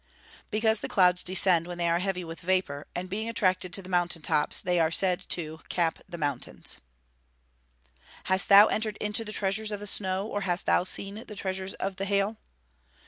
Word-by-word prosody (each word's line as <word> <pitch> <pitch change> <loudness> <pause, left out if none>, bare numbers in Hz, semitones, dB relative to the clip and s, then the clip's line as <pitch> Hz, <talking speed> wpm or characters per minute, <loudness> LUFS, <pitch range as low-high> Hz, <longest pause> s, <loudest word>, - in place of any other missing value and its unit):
"_ - - -40 0.5
Because 220 0 +1
the - - -4
clouds 180 -2 +4
descend 180 -2 +3
when 175 -1 -6
they 170 -1 0
are 170 +1 +2
heavy 185 -1 -2
with 165 0 -8
vapour, 180 -6 -1
and 180 +1 -3
being 215 +4 -3
attracted 185 -5 +1
to 195 - 0
the - - -11
mountain 175 -3 0
tops 150 - +1
they 180 -1 0
are 160 -1 +3
said 180 +1 +1
to 160 -2 -3
"cap 170 -2 0
the 170 - -7
mountains." 145 -5 -3
[Verse: 60 +1 -35 0.3
"Hast 190 -1 +1
thou 200 +1 +10
entered 215 -1 -2
into 210 +2 -1
the 215 - -6
treasures 210 +1 +1
of 205 - -3
the 205 - -7
snow; 190 -1 0
or 205 -2 -4
hast 180 -2 -1
thou - - +3
seen 200 +3 -4
the 210 - -9
treasures 190 0 -3
of 190 0 -4
the 195 - -2
hail." 200 +2 0
185 Hz, 200 wpm, -27 LUFS, 165-200 Hz, 0.5 s, thou